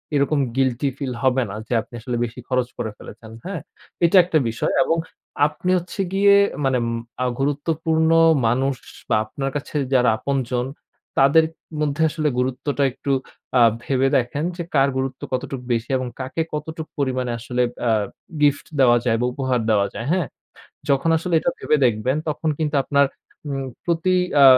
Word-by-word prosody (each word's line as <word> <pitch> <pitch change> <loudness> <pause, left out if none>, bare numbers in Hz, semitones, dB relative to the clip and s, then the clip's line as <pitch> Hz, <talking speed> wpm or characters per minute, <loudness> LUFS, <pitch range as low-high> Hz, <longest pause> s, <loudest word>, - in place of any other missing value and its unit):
এরকম 145 +1 +2 0.2
guilty 135 +1 +1
feel 135 -3 -3
হবে 130 0 +3
না 100 - -6
যে - - -2
আপনি 120 - -19
আসলে 125 +1 -3
বেশি 120 +2 -9
খরচ 125 -1 +1
করে 110 - -3
ফেলেছেন, 110 0 -12
হ্যাঁ? 185 -3 -4 0.4
এটা 180 +3 +5
একটা 170 -2 +1
বিষয় 115 - -1
এবং 165 - +1 0.5
আপনি 180 +4 -4
হচ্ছে 180 +3 -7
গিয়ে 200 +1 +6 0.3
মানে 130 -1 +2
ম - - -1 0.3
আ - - +1
গুরুত্বপূর্ণ 160 +3 +1 0.4
মানুষ 130 +4 +1 0.3
বা - - +3
আপনার 135 +5 -4
কাছে 145 - -5 0.2
যারা 125 -2 +5
আপনজন 125 -2 -1 0.5
তাদের 140 +4 +6 0.4
মধ্যে 145 0 0
আসলে 155 0 -1
গুরুত্বটা 130 +3 -1
আ - - +4
একটু 140 +2 -4 0.7
ভেবে 135 0 +1
দেখেন 130 +5 -1
যে 170 - -3
কার 140 -1 +4
গুরুত্ব 130 0 -3
কতটুক 130 0 -3
বেশি 115 -1 -1
এবং 130 -1 -3
কাকে 130 +5 -3
কতটুক 160 +1 -5
পরিমাণে 130 -3 -1
আসলে 125 +2 -2 0.3
আ - - +4 0.5
গিফট 145 0 +3
দেওয়া 120 -2 +6
যায় 115 -1 +2
বা - - +2
উপহার 130 -2 0
দেওয়া 100 -2 +3
যায়, - - -5
হ্যাঁ? 180 -5 +1 0.6
যখন 140 +4 +2
আসলে 175 +2 -3
এটা 260 - 0
ভেবে 150 - +2
দেখবেন 120 +3 +1
তখন 155 +1 -1
কিন্তু 150 -2 -1
আপনার 140 0 +3 0.4
উম 135 -1 -3 0.2
প্রতি 170 +2 +1 0.3
আ - - +9
135 Hz, 165 wpm, -22 LUFS, 125-155 Hz, 0.7 s, আ